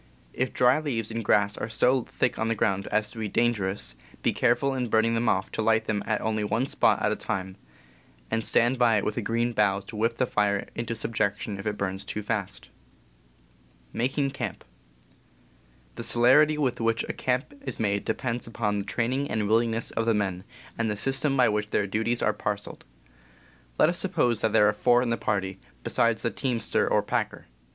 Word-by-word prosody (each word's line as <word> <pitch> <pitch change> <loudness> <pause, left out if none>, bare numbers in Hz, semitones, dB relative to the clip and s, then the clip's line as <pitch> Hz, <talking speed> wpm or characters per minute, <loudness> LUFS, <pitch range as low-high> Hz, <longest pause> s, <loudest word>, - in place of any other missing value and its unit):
If 130 0 -1
dry 125 +4 +4
leaves 115 -8 -3
and 115 0 -3
grass 100 0 +2
are 110 - -3
so 125 +4 +3
thick - - -1
on 110 - 0
the 115 - 0
ground 100 -2 0
as 110 -1 0
to 115 - -9
be 110 - -2
dangerous, 100 - 0 0.3
be - - +2
careful 130 +3 +2
in 125 -3 -2
burning 110 +1 +3
them 115 0 +1
off 95 +1 0
to - - -2
light 110 0 +2
them 105 -2 -1
at 110 - 0
only 110 -1 -1
one 110 +5 0
spot - - +2
at - - +2
a - - 0
time, 95 0 -4 0.8
and 115 - 0
stand 120 +3 +2
by 115 -3 +4
it 100 - -1
with 105 - -1
a - - 0
green 115 +3 0
bough 100 -3 +2
to 100 +3 -11
whip 115 +2 0
the 130 - +2
fire 105 -3 0
into 115 0 -3
subjection 105 -2 -2
if 95 - -5
it 105 -1 -2
burns 95 0 -3
too 105 +1 -5
fast. 100 -2 -4 1.2
The 135 +3 -1 1.4
celerity 145 +6 +4
with 130 -5 -1
which 115 0 +1
a - - -3
camp 125 - -1
is - - -5
made 100 -2 0
depends 120 -2 -3
upon 105 -3 -1
the 100 - -4
training 125 +6 -1
and 105 -2 -1
willingness 115 +1 +1
of 115 0 -2
the 115 - +3
men, 95 -2 -2 0.3
and 115 -1 +1
the 105 - -2
system 135 +5 +1
_^,. - - -1
by 125 - +5
which 105 0 -1
their 105 - +1
duties 110 +4 -1
are - - +2
parceled. - - -5 0.9
Let - - +6
_ - - +2
us - - -4
suppose 120 -3 +1
that 110 - +1
there 105 - +5
are 105 - +3
four 120 +3 +3
in 120 - -1
the 115 - +1
party, 95 -3 -2 0.2
besides 115 -1 +1
the 115 - 0
teamster 120 -5 0
or - - +2
packer. - - -2
115 Hz, 200 wpm, -26 LUFS, 105-120 Hz, 1.4 s, Let